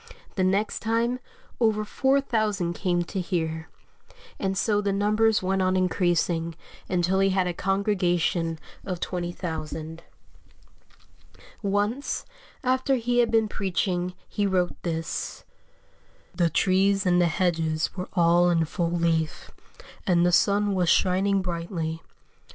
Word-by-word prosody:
The 190 - 0
next 195 +3 +1
time 230 +2 0 0.4
over 215 -2 +2
4,000 215 -9 +1
came 175 -1 0
to 190 +2 -4
hear; 160 -3 -3 0.7
and 195 0 -1
so 205 +1 +2
the 200 -1 0
numbers 210 +2 +2
went 190 +1 +1
on 185 0 +2
increasing 175 -2 +1 0.3
until 180 +1 +1
he 195 0 +4
had 190 -1 +1
a 180 - -1
congregation 180 -4 0 0.3
of 180 -3 -4
20,000. 165 -3 -4 1.6
Once, 205 +6 -1 0.4
after 260 +1 +2
he 245 0 0
had 240 - +4
been 225 -1 +3
preaching, 185 -3 -1
he 205 -1 -1
wrote 180 -2 +1
this: 165 -2 -4 0.9
"The 170 -2 +2
trees 195 +4 +2
and 180 -1 +4
the 175 - +4
hedges 165 -2 0
were 185 0 -5
all 175 0 +4
in 165 -2 +2
full 170 +2 -2
leaf, 165 -2 -1 0.6
and 175 -2 +4
the 180 - +3
sun 205 +3 +3
was 180 -3 +1
shining 190 +2 +3
brightly. 170 -2 -3
185 Hz, 125 wpm, -26 LUFS, 170-205 Hz, 1.6 s, he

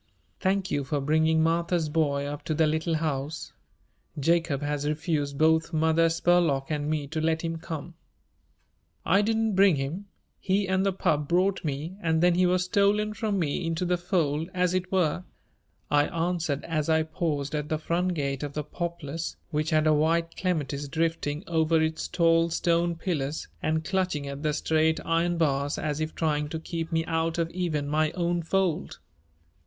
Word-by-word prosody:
"Thank 190 0 0
you 145 -1 0
for 145 +2 -1
bringing 160 +3 +2
Martha's 170 0 +1
boy 145 -2 0
up 145 +1 -5
to 155 - -1
the 160 - +3
Little 160 +2 0
House. 155 -1 -3 0.7
Jacob 165 -1 +1
has 145 0 -1
refused 150 -2 -1
both 160 +2 +3
Mother 160 +1 +3
Spurlock 165 -4 +2
and 150 0 -1
me 155 -2 -1
to 155 +3 -3
let 160 +1 0
him 165 0 -2
come." 165 0 -6 1.1
"I 195 - +4
didn't 220 0 +1
bring 195 -2 +5
him. 150 +9 -4 0.3
He 195 0 0
and 190 0 +1
the 195 - +2
pup 150 -5 0
brought 185 +4 +1
me 155 +5 -4
and 160 -1 +1
then 180 0 +5
he 180 +1 +3
was 180 0 +2
stolen 205 +3 +2
from 210 -1 -1
me 160 -1 -1
into 165 +2 -1
the 180 0 +2
fold, 170 -3 -1
as 180 -1 +2
it 185 0 -2
were," 180 -2 +1 0.7
I 145 0 +4
answered 165 -4 -1
as 155 -2 -2
I 160 0 +3
paused 155 -3 -2
at 150 -1 -2
the 155 - 0
front 175 +3 -1
gate 140 -3 -2
of 145 -1 -4
the 150 - -3
Poplars, 165 0 -5
which 155 +1 0
had 155 0 +2
a 155 - +5
white 165 +2 +1
clematis 145 -6 -2
drifting 160 0 -1
over 160 -1 +2
its 160 0 -1
tall 165 -1 +3
stone 170 +1 +1
pillars 160 -4 -3
and 160 0 0
clutching 185 -6 -1
at 140 0 -6
the 150 -1 0
straight 160 +1 +1
iron 170 +1 +1
bars 145 -3 +1
as 150 -1 -2
if 155 0 -3
trying 150 -2 0
to 160 - -4
keep 165 0 -5
me 165 0 +1
out 165 0 -1
of 165 0 -1
even 165 -5 -2
my 155 +1 +2
own 175 -1 0
fold. 180 0 -1
160 Hz, 180 wpm, -27 LUFS, 150-175 Hz, 1.1 s, bring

